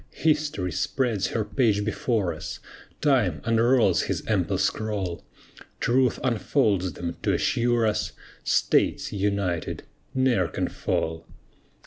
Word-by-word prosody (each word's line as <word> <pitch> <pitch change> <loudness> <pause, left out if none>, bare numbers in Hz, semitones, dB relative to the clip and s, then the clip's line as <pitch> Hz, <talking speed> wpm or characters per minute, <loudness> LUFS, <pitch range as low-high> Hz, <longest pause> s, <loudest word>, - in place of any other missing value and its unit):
History 150 - 0
spreads 110 - 0
her 110 0 -2
page 105 -2 +1
before 110 -4 0
us, 80 - -7 0.4
Time 120 - +2
unrolls 115 +1 +3
his - - -2
ample - - +1
scroll; 100 -5 -2 0.6
Truth 125 0 +2
unfolds 105 - +1
them, 85 +2 -5
to - - +1
assure 120 -1 +2
us, 105 -1 0 0.3
States, - - +1
united, 100 -4 -1 0.3
ne'er 125 -9 +2
can - - -2
fall. 80 0 -2
110 Hz, 110 wpm, -25 LUFS, 95-125 Hz, 0.6 s, unrolls